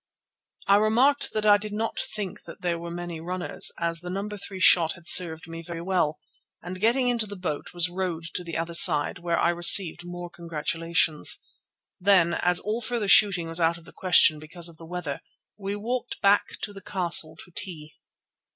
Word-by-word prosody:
I 200 Hz, -, +4 dB
remarked 245 Hz, +7 st, +2 dB
that 215 Hz, 0 st, -2 dB
I 205 Hz, -1 st, +6 dB
did 210 Hz, 0 st, -8 dB
not 225 Hz, +2 st, -3 dB
think 205 Hz, -4 st, -5 dB, 0.2 s
there 175 Hz, -2 st, -2 dB
were 170 Hz, 0 st, -7 dB
many 170 Hz, -1 st, -7 dB
runners, 180 Hz, +2 st, -2 dB
as 170 Hz, 0 st, -2 dB
the 180 Hz, +1 st, -8 dB
No. 195 Hz, +3 st, -4 dB
3 200 Hz, -2 st, -8 dB
shot 170 Hz, -3 st, +5 dB
had 170 Hz, -1 st, -14 dB
served 165 Hz, -3 st, +4 dB
me 165 Hz, 0 st, -8 dB
very 165 Hz, 0 st, -8 dB
well, 175 Hz, -5 st, 0 dB, 0.4 s
and 185 Hz, +2 st, -9 dB
getting 245 Hz, +4 st, +2 dB
into 235 Hz, -3 st, +1 dB
the 205 Hz, -, -8 dB
boat 180 Hz, -6 st, -5 dB
was 175 Hz, 0 st, +2 dB
rowed 175 Hz, -2 st, -4 dB
to 180 Hz, -, -5 dB
the 165 Hz, -2 st, -5 dB
other 165 Hz, +1 st, -4 dB
side, 155 Hz, -3 st, +5 dB
where 170 Hz, -1 st, -2 dB
I -, -, +2 dB
received 175 Hz, 0 st, +5 dB
more 175 Hz, 0 st, -8 dB
congratulations. 165 Hz, -, -1 dB, 0.6 s
Then, 180 Hz, -3 st, +3 dB
as 180 Hz, 0 st, +2 dB
all 215 Hz, +3 st, -3 dB
further 230 Hz, -2 st, -3 dB
shooting 195 Hz, -5 st, +4 dB
was 165 Hz, +1 st, -4 dB
out 165 Hz, 0 st, +1 dB
of 165 Hz, -, -17 dB
the -, -, -16 dB
question 170 Hz, -4 st, +4 dB
because 165 Hz, +3 st, -6 dB
of 165 Hz, -2 st, -10 dB
the 165 Hz, -, -13 dB
weather, 165 Hz, -5 st, -6 dB, 0.3 s
we 200 Hz, 0 st, -5 dB
walked 240 Hz, +4 st, -5 dB
back 200 Hz, +1 st, +2 dB
to 205 Hz, -, -5 dB
the 195 Hz, -, -11 dB
castle 180 Hz, -5 st, +2 dB
to 180 Hz, -, -22 dB
tea. 155 Hz, -4 st, -6 dB
175 Hz, 190 wpm, -25 LUFS, 165-200 Hz, 0.6 s, I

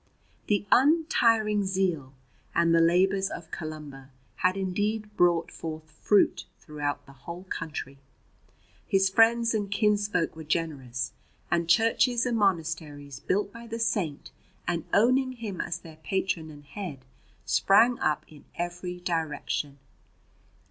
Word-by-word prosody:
The 205 Hz, -1 st, +1 dB
untiring 230 Hz, -8 st, +4 dB
zeal 180 Hz, -8 st, -1 dB, 0.4 s
and 170 Hz, 0 st, +4 dB
the 165 Hz, -, +5 dB
labours 190 Hz, +3 st, +3 dB
of 165 Hz, -2 st, -8 dB
Columba 150 Hz, -4 st, -7 dB, 0.3 s
had 185 Hz, +1 st, +2 dB
indeed 210 Hz, +3 st, -2 dB
brought 175 Hz, -3 st, +3 dB
forth 155 Hz, -1 st, -7 dB
fruit 200 Hz, +6 st, +2 dB
throughout 145 Hz, -2 st, -4 dB
the 140 Hz, -, -15 dB
whole 170 Hz, +7 st, -9 dB
country. 145 Hz, -4 st, -5 dB, 0.9 s
His 195 Hz, 0 st, +3 dB
friends 230 Hz, +2 st, +4 dB
and 205 Hz, -2 st, -1 dB
kinsfolk 205 Hz, -4 st, +1 dB
were 160 Hz, -, -8 dB
generous, 145 Hz, -6 st, -2 dB, 0.4 s
and 170 Hz, -1 st, +1 dB
churches 230 Hz, +5 st, +3 dB
and 245 Hz, -2 st, 0 dB
monasteries 160 Hz, -8 st, -1 dB
built 200 Hz, +5 st, -1 dB
by 235 Hz, 0 st, -10 dB
the 230 Hz, 0 st, -4 dB
Saint 205 Hz, -10 st, -1 dB, 0.4 s
and 170 Hz, -1 st, -1 dB
owning 255 Hz, +4 st, +3 dB
him 220 Hz, -7 st, -5 dB
as 175 Hz, 0 st, -3 dB
their 165 Hz, -3 st, -13 dB
patron 180 Hz, -2 st, -2 dB
and 145 Hz, -1 st, -13 dB
head 150 Hz, -7 st, -7 dB, 0.4 s
sprang 230 Hz, +5 st, +4 dB
up 150 Hz, -, 0 dB
in 150 Hz, -2 st, -16 dB
every 175 Hz, +1 st, -4 dB
direction. 155 Hz, -4 st, -2 dB
175 Hz, 125 wpm, -27 LUFS, 155-210 Hz, 0.9 s, the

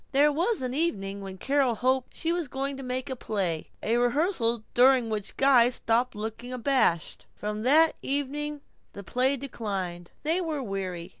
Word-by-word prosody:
There 290 Hz, +2 st, +5 dB
was 345 Hz, -, 0 dB
an 250 Hz, 0 st, -2 dB
evening 200 Hz, -11 st, -1 dB
when 190 Hz, -1 st, -7 dB
Carol 270 Hz, +2 st, +1 dB
hoped 255 Hz, +2 st, 0 dB
she 330 Hz, -, -1 dB
was 345 Hz, -3 st, -2 dB
going 275 Hz, +2 st, -3 dB
to -, -, -7 dB
make 255 Hz, 0 st, -3 dB
a 260 Hz, -, -3 dB
play; 190 Hz, -9 st, -2 dB
a 230 Hz, +2 st, +1 dB
rehearsal 245 Hz, -, +1 dB
during 250 Hz, -2 st, +4 dB
which 210 Hz, -2 st, -4 dB
Guy 260 Hz, -3 st, +6 dB
stopped 245 Hz, 0 st, +1 dB
looking 220 Hz, +3 st, -6 dB
abashed. 250 Hz, -, 0 dB
From 210 Hz, 0 st, -4 dB
that 310 Hz, +7 st, +5 dB
evening 290 Hz, +1 st, -3 dB, 0.3 s
the 200 Hz, -, -8 dB
play 255 Hz, +7 st, +1 dB
declined. 195 Hz, -9 st, -4 dB
They 325 Hz, +5 st, +1 dB
were 310 Hz, -5 st, -2 dB
weary. 185 Hz, -4 st, -4 dB
250 Hz, 165 wpm, -27 LUFS, 210-280 Hz, 0.3 s, Guy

